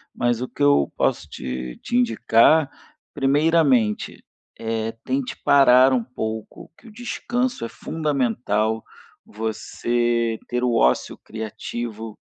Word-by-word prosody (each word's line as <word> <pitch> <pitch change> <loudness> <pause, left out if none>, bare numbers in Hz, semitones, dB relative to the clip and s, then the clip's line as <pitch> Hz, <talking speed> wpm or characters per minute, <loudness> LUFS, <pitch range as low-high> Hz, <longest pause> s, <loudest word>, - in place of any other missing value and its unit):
mas 120 -1 0
o 130 - -2
que 145 - -4
eu 145 - +4
posso - - 0
te 65 -1 -6
te 240 - -3
indicar, 155 - +4 0.4
primeiramente: 140 -5 +2 0.3
eh, 115 0 -2
tente 265 -2 -2
parar 130 -2 +6
um 120 -3 +1
pouco, 110 -1 -6
que 240 - -18
o - - -12
descanso 245 - -2
é - - -6
fundamental, 115 -8 -1 0.4
você 115 +1 -1
ter 125 0 -2
o 125 -1 +1
ócio 65 - +2
criativo 110 0 -6
120 Hz, 115 wpm, -22 LUFS, 110-145 Hz, 0.4 s, parar